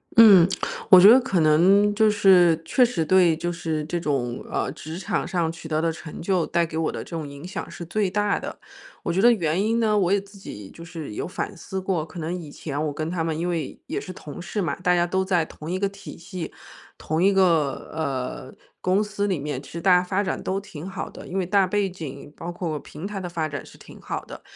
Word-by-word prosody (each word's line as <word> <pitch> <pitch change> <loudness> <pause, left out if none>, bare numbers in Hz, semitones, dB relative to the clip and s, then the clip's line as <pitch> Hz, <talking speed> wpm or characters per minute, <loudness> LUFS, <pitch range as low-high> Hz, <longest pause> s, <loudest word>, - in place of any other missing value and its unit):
嗯， 200 -7 +9 0.4
我 185 - +10
觉 195 +3 +9
得 245 +4 +9
可 195 -9 0
能 190 +7 +5
就 220 +1 +4
是 180 -5 +5
确 250 +10 +3
实 235 -9 +1
对 180 -1 +5
就 175 +2 -3
是 160 -3 -3
这 170 +3 -2
种 135 -7 -2
呃， - - -1
职 160 +2 -8
场 190 - -2
上 170 -3 0
取 165 -1 -10
得 155 0 0
的 165 - +1
成 160 -1 -9
就， 180 -1 +1
带 170 -1 +1
给 160 -1 -6
我 160 - 0
的 - - -5
这 - - -15
种 165 -3 -4
影 140 +2 -10
响 185 - -6
是 - - -8
最 200 +3 0
大 205 +1 +1
的。 - - -7 0.5
我 - - -1
觉 190 - +2
得 240 - +7
原 170 -4 +1
因 225 +3 +1
呢， 215 -2 +2
我 185 -3 +2
也 200 - +4
自 200 +1 -16
己 100 - -9
就 165 - -11
是 160 -8 -7
有 - - -4
反 200 +3 -4
思 190 +2 -5
过， 180 -5 -1
可 170 +2 -10
能 165 +2 -3
以 170 -4 -6
前 145 0 -5
我 - - -2
跟 155 +2 -3
他 175 -2 -1
们 160 -1 -2
因 170 - -2
为 165 -6 -3
也 - - -2
是 185 - -7
同 155 -1 -9
事 180 +4 -3
嘛， 175 - -1
大 180 0 +2
家 175 0 +3
都 190 +2 0
在 180 -4 +2
同 155 0 -10
一 185 - -1
个 200 +1 +1
体 195 0 -11
系， 170 0 -7 0.5
同 160 +2 -2
一 200 - +5
个， 165 -7 +2
呃， 135 -4 -4 0.3
公 190 +3 +2
司 205 -1 -2
里 185 -5 0
面， 140 -2 -4
其 135 - -14
实 170 - -6
大 185 0 +5
家 180 - +4
发 190 +2 0
展 190 - -2
都 190 +1 -1
挺 180 -3 -9
好 190 - -5
的。 - - -11
因 190 - -4
为 185 - 0
大 195 +1 +3
背 200 +1 0
景 145 -5 -9
包 170 +1 -6
括 170 -3 -3
平 150 +5 -9
台 205 0 -4
的 185 - -5
发 165 -2 -2
展 145 -1 -5
是 - - -15
挺 - - -14
好 - - -4
的。 - - -10
175 Hz, 270 characters per minute, -24 LUFS, 160-195 Hz, 0.5 s, 我